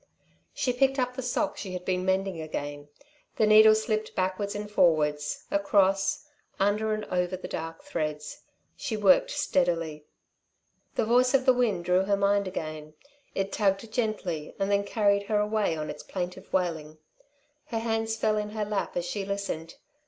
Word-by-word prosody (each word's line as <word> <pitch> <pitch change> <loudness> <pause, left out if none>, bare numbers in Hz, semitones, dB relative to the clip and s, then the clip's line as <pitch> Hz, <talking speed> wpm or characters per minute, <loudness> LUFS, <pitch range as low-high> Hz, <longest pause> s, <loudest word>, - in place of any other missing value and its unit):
She 250 - -1
picked 270 +2 +2
up 250 -1 -1
the 260 - -3
sock 260 +4 -1
she 190 -3 -6
had 180 0 -6
been 185 -1 0
mending 190 -2 0
again. 145 -2 -5 0.5
The 220 - +3
needle 215 0 +8
slipped 215 0 -2
backwards 190 +2 -1
and 210 0 -4
forwards, 150 -7 +1
across, 195 +2 +2 0.3
under 210 +2 +1
and 215 - -5
over, 180 0 0
the 185 - -7
dark 165 0 -6
threads. 150 -2 -4 0.3
She 220 - -3
worked 195 -3 +5
steadily. 170 - 0 0.9
The - - +1
voice 250 +3 +4
of 265 -1 +2
the 260 - +6
wind 215 -9 0
drew 180 +1 +3
her 200 0 +2
mind 200 0 +2
again. 155 -4 -6 0.4
It 195 0 -1
tugged 205 +2 0
gently 200 -10 -2
and 195 +1 -1
then 200 0 +2
carried 200 -1 +1
her 210 - +1
away 210 -5 0
on 155 0 -3
its - - -9
plaintive 180 +1 -6
wailing. 160 -4 -1 0.7
Her 230 - -4
hands 225 0 -1
fell 215 -1 +1
in 210 0 -2
her 215 -1 -2
lap 205 -3 -2
as 175 - -1
she 195 +3 -3
listened. 195 -5 -4
200 Hz, 165 wpm, -28 LUFS, 175-215 Hz, 0.9 s, needle